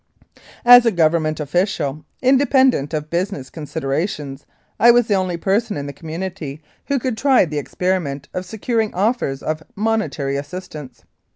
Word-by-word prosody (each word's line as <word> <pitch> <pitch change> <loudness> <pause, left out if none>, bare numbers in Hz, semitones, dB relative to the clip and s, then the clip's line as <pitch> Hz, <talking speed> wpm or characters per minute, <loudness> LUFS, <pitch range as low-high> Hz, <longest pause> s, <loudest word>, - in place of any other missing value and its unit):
As 245 0 +10
a - - +4
Government 160 -3 +1
official, 150 -2 -1 0.2
independent 260 - +3
of 155 -1 -4
business 170 -6 -3
considerations, 145 -1 -4 0.3
I 235 - +7
was 240 0 +6
the 215 - 0
only 185 -3 0
person 205 +3 0
in 140 - -4
the 140 - -6
community 165 -2 -6 0.3
who 280 - +1
could 255 -2 -2
try 270 -7 +4
the 150 -2 -3
experiment 145 -3 -2
of 185 - -3
securing 220 +3 -2
offers 195 - 0
of 155 0 -2
monetary 205 -10 -1
assistance. 145 -3 -8
175 Hz, 145 wpm, -20 LUFS, 150-220 Hz, 0.3 s, As